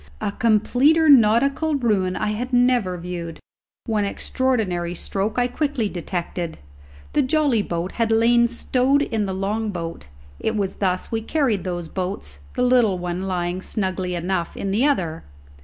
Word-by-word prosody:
A - - -2
completer 250 +9 +3
nautical 275 +5 +4
ruin 205 -8 +1
I 215 - -1
had 240 +5 -3
never 245 -7 +2
viewed. 170 -2 -6 0.5
One 215 -2 0
extraordinary 200 -6 -1
stroke 200 +5 -2
I 245 0 +3
quickly 255 -4 -1
detected. 175 -1 -4 0.6
The 295 - +3
jolly 280 -4 +2
boat 175 -1 -3
had 230 -1 0
lain 235 +1 +4
stowed 255 +3 +1
in 220 -6 -1
the 190 - -3
long 210 +3 -1
boat; 170 - -6 0.3
it 220 - -1
was 200 -3 -2
thus 185 -2 -1
we 225 -1 -1
carried 230 - 0
those 175 -2 -3
boats, 180 - -4 0.2
the 250 - +1
little 245 -6 +3
one 180 +1 -3
lying 180 0 -2
snugly 185 -3 -2
enough 175 0 -2
in 195 - -2
the 230 +8 +3
other. 170 - -1
210 Hz, 155 wpm, -22 LUFS, 180-245 Hz, 0.6 s, nautical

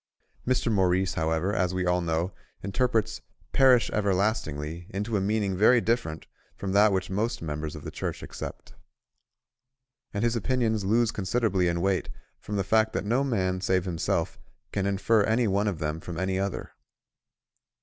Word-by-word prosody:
Mr. 125 -2 +1
Maurice, 95 -1 +2
however, 80 +3 0
as 90 -1 0
we 90 -1 0
all 90 0 +2
know, 85 +2 -1 0.3
interprets 110 +2 0 0.3
"perish 130 -3 +5
everlastingly" 90 - -1
into 105 +2 -3
a 100 - +1
meaning 100 -1 0
very 110 +6 +5
different 115 -10 -1 0.3
from 95 - -4
that 105 +2 +5
which 95 -1 -1
most 115 +4 -1
members 75 -1 -4
of - - -9
the - - -6
Church - - -4
accept. - - -8 1.4
And 100 +2 -2
his 120 0 +2
opinions 115 -2 0
lose 115 +3 +2
considerably 100 -2 0
in 85 0 0
weight 95 0 0 0.3
from 105 - -5
the 100 - +1
fact 110 +3 +2
that - - -2
no 120 +6 +2
man 95 -8 0
save 95 -1 +1
himself 85 -3 -1 0.3
can 100 -1 -1
infer 100 +3 +2
any 110 +3 +2
one 100 +1 +1
of 100 -5 -1
them 75 0 -3
from 85 0 -6
any 95 0 0
other. 100 0 -3
100 Hz, 160 wpm, -27 LUFS, 90-110 Hz, 1.4 s, perish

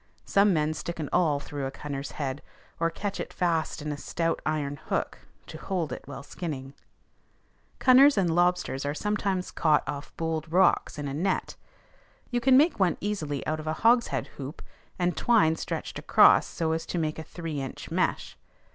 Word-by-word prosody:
Some 200 +1 +4
men 155 -2 +1
stick 170 +2 -6
an 150 - -3
awl 160 -5 +3
through 145 -1 -5
a - - -3
cunner's 140 0 -6
head, 140 -1 -3 0.4
or 165 0 +2
catch 200 +4 -4
it - - -5
fast 165 -4 -1
in 150 - -3
a 145 - -4
stout 165 +2 -2
iron 145 -2 -1
hook, - - -2 0.3
to - - -9
hold 170 -8 -2
it - - -6
while 140 0 -8
skinning. 140 -4 -6 1.0
Cunners 265 +1 +6
and 175 -4 +2
lobsters 175 -5 +1
are 145 +1 -2
sometimes 200 -1 -1
caught 155 -4 +2
off 145 0 -5
bold 160 -1 -3
rocks 180 -3 +3
in 145 -1 -4
a 135 - -4
net. 185 +6 -1 0.8
You 240 0 0
can 260 +1 +6
make 305 -2 +3
one 180 -4 +2
easily 160 -9 -3
out 155 0 -1
of 155 - -7
a 155 - 0
hogshead 235 +1 +3
hoop, 140 +3 -7 0.3
and 180 0 0
twine 210 -10 +3
stretched - - -5
across - - +5
so 160 -1 -2
as 160 0 -2
to - - -3
make 155 -1 -1
a - - -5
three 160 -3 -5
inch 135 - -7
mesh. - - -1
160 Hz, 180 wpm, -27 LUFS, 145-185 Hz, 1.0 s, Cunners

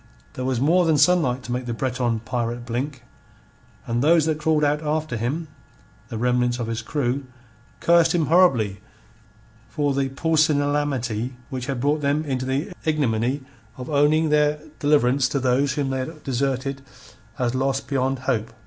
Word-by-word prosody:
There 130 - -4
was 130 -2 0
more 170 +7 +4
than 160 -2 +3
sunlight 145 -5 +3
to 120 - -7
make 125 0 -3
the 120 - -2
Breton 120 -2 -1
pirate 120 0 -3
blink. 125 +2 -4 0.8
And 120 +1 -1
those 160 +2 +4
that 155 -1 0
crawled 155 0 +1
out 150 +1 +2
after 155 -3 -2
him 135 +9 -2 0.6
the 115 - -6
remnants 125 +1 +1
of 120 - -3
his 115 0 -3
crew 135 +2 -2 0.6
cursed 170 -1 +4
him 165 -3 +2
horribly 135 - +3 0.9
for 145 -3 0
the 135 0 0
pusillanimity 145 -6 0 0.2
which 130 -1 -4
had 135 -3 -2
brought 145 +4 +1
them 145 +2 0
into 130 -2 -2
the 145 +9 -2
ignominy 135 -3 0 0.3
of 130 +4 -7
owing 150 +2 +3
their 150 0 +3 0.2
deliverance 140 -3 +3
to 140 - -1
those 130 +2 +1
whom 140 -2 -1
they 130 - -1
had 155 +4 -6
deserted 135 +1 -2 0.6
as 125 -1 0
lost 135 +1 -1
beyond 135 -1 0
hope. 115 -5 -1
135 Hz, 160 wpm, -23 LUFS, 125-150 Hz, 0.9 s, more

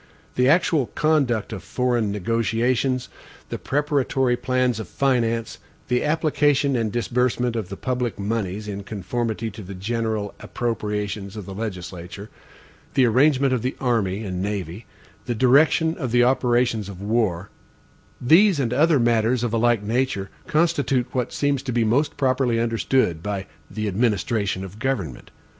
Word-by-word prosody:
The 125 +1 +3
actual 160 -4 +3
conduct 135 -9 +1
of 95 - -6
foreign 120 -4 0
negotiations, 115 +5 0 0.4
the - - -4
preparatory 135 -3 +1
plans 125 -2 0
of 110 - -6
finance, 115 -4 0 0.3
the 125 0 +1
application 150 -3 +2
and 115 -3 0
disbursement 125 0 0
of 110 -5 -3
the 100 - -6
public 125 -4 -2
moneys 105 -1 -3
in 100 -1 -4
conformity 110 +3 -3
to 105 - -9
the 100 0 -8
general 110 +1 -2
appropriations 105 -3 -3
of 105 -3 -7
the 95 - -7
legislature, 95 -1 -6 0.6
the 130 -2 +5
arrangement 135 +3 +3
of 125 - 0
the 130 +3 -2
army 110 -5 0
and 90 -3 -4
navy, 100 0 -4 0.4
the 120 - -1
directions 150 +6 +4
of 130 -5 -3
the 120 0 +4
operations 120 -4 +1
of 95 -2 -9
war 100 -4 -1 0.7
these, 170 +6 +5
and 125 -3 0
other 150 +2 +4
matters 120 +1 +2
of 120 -2 -1
a - - +2
like 120 -2 +2
nature, 115 -3 -1 0.2
constitute 150 -7 +1
what 125 -2 -1
seems 145 -2 0
to 135 -2 -4
be 120 -1 +2
most 140 +7 +1
properly 130 -4 +1
understood 115 -5 +1
by 100 0 -3 0.2
the 110 -1 -3
administration 105 -1 0
of 95 +3 -11
government. 100 - -3
120 Hz, 150 wpm, -23 LUFS, 105-130 Hz, 0.7 s, the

